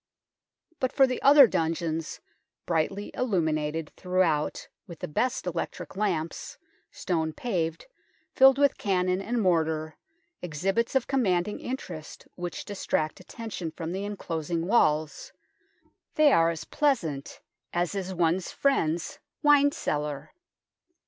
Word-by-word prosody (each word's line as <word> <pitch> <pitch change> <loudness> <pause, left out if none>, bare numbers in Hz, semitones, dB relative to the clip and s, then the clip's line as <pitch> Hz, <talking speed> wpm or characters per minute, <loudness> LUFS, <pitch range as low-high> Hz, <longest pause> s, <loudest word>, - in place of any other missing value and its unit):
But 255 - 0
for 270 - +5
the 255 -1 -3
other 280 0 +9
dungeons, 165 -4 -2 0.4
brightly 180 +5 -1
illuminated 160 -8 -1
throughout 180 -5 0 0.2
with 170 - -9
the - - -5
best 245 +11 -1
electric 175 +1 -4
lamps, 180 -6 -2 0.3
stone 160 -3 -2
paved, 165 -5 -2 0.5
filled 265 0 +7
with 285 -1 +3
cannon 185 -1 +1
and 235 +4 -2
mortar, 160 -5 0 0.4
exhibits 190 - -1
of 265 - +3
commanding 205 -7 0
interest 245 - -7
which 175 -2 -6
distract 160 -6 -2
atten 230 -1 -8
tion 170 -4 -4
from 165 +1 -6
the 190 +2 -3
enclosing 170 -5 -3
walls 155 -7 +1 0.8
they 305 -2 +6
are 165 0 +4
as 165 -2 -4
pleasant 170 - -1 0.3
as 175 +1 -1
is 190 -2 -3
one's 175 0 0
friend's 170 - 0 0.2
wine 290 -1 +6
cellar. 150 - -3
180 Hz, 120 wpm, -27 LUFS, 160-225 Hz, 0.8 s, other